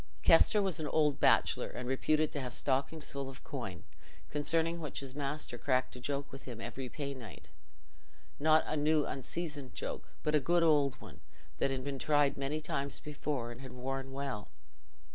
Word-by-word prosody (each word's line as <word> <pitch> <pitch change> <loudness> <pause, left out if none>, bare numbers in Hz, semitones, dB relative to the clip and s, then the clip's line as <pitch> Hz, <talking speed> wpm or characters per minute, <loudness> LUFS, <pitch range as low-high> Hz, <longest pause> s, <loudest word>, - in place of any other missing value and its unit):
Kester 200 +5 +6
was 190 -3 0
an 155 - -2
old 150 -1 +2
bachelor - - +4
and 125 0 -6
reputed 155 +4 +2
to 145 - -3
have 125 -2 -2
stockings 140 +3 0
full 140 -1 -4
of 135 - -11
coin, 120 - -5 0.5
concerning 165 +3 +1
which 150 -3 -4
his 135 -2 -7
master 140 -3 -3
cracked 130 -2 +1
a - - -7
joke 140 +2 -3
with 135 0 -10
him 120 -4 -7
every 130 +2 -5
pay 140 0 -4
night: 115 -7 -10 0.9
not 155 +1 +5
a 155 - -1
new 150 0 +3
unseasoned 145 0 -4
joke, - - -5
but 150 - +1
a 150 - +6
good 170 +5 +3
old 145 -4 +4
one, - - -13 0.4
that - - +2
had 130 -1 -2
been 140 -1 -3
tried 145 -1 +3
many 140 +3 -2
times 140 -2 -2
before 145 -5 -3
and 120 - -9
had 130 -2 -8
worn 135 +1 -4
well. 135 -6 -4
140 Hz, 180 wpm, -33 LUFS, 130-150 Hz, 0.9 s, Kester